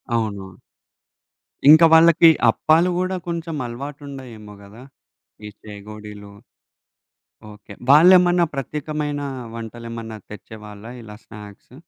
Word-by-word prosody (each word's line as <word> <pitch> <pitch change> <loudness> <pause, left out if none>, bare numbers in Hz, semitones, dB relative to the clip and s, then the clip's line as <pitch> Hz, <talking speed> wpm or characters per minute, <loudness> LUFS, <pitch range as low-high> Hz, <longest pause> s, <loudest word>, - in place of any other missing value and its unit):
అవును. 100 -4 -4 1.2
ఇంకా 160 +2 +8
వాళ్ళకి 165 0 +6 0.2
అప్పాలు 160 +8 +1
కూడా 185 +1 -2
కొంచెం 170 -1 -5
అలవాటు 140 +5 -8
ఉండాయేమో 120 -7 -11
కదా! 105 +4 -15 0.7
ఈ - - -7
చేగోడీలు. 105 0 -12 1.2
ఓకే. 105 -1 -15 0.2
వాళ్ళేమన్నా 175 +3 +5
ప్రత్యేకమైన 150 +1 -5 0.3
వంటలు 115 0 -9
ఏమన్నా 115 -1 -8
తెచ్చేవాళ్ళా 105 0 -12
ఇలా 105 -2 -12
స్నాక్సు? 105 +2 -14
120 Hz, 95 wpm, -20 LUFS, 105-155 Hz, 1.2 s, ఇంకా